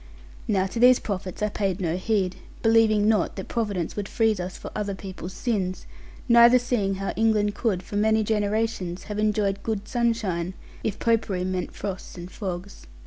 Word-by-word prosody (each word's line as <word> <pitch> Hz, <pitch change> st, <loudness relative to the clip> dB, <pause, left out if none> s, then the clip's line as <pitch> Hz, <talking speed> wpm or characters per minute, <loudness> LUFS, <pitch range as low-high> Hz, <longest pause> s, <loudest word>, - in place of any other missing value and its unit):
Now 195 Hz, -3 st, +2 dB
to 195 Hz, +5 st, -4 dB
these 250 Hz, +1 st, +7 dB
prophets 190 Hz, -1 st, -4 dB
I 210 Hz, -, +2 dB
paid 195 Hz, -2 st, -1 dB
no 170 Hz, -3 st, 0 dB
heed, 190 Hz, -1 st, 0 dB, 0.3 s
believing 225 Hz, -2 st, +4 dB
not 215 Hz, -1 st, +2 dB
that 190 Hz, -, -6 dB
Providence 205 Hz, -8 st, -2 dB
would 205 Hz, -1 st, -4 dB
freeze 220 Hz, -3 st, +2 dB
us 180 Hz, +1 st, -5 dB
for -, -, -8 dB
other 205 Hz, -2 st, -2 dB
people's 190 Hz, -1 st, -8 dB
sins; 195 Hz, -7 st, -2 dB, 0.4 s
neither 235 Hz, +1 st, +8 dB
seeing 235 Hz, -6 st, 0 dB
how 195 Hz, +1 st, -3 dB
England 215 Hz, -2 st, +2 dB
could 200 Hz, -5 st, -1 dB
for 205 Hz, -, -5 dB
many 220 Hz, +1 st, +3 dB
generations 210 Hz, -3 st, -1 dB
have 210 Hz, 0 st, -5 dB
enjoyed 210 Hz, -2 st, +1 dB
good 215 Hz, -2 st, -3 dB
sunshine, 215 Hz, -8 st, -1 dB, 0.3 s
if 210 Hz, -1 st, -2 dB
Popery 220 Hz, -5 st, +1 dB
meant 185 Hz, -1 st, -3 dB
frost 190 Hz, -2 st, -6 dB
and 175 Hz, +1 st, -8 dB
fogs. 185 Hz, -1 st, -6 dB
205 Hz, 170 wpm, -25 LUFS, 190-225 Hz, 0.4 s, neither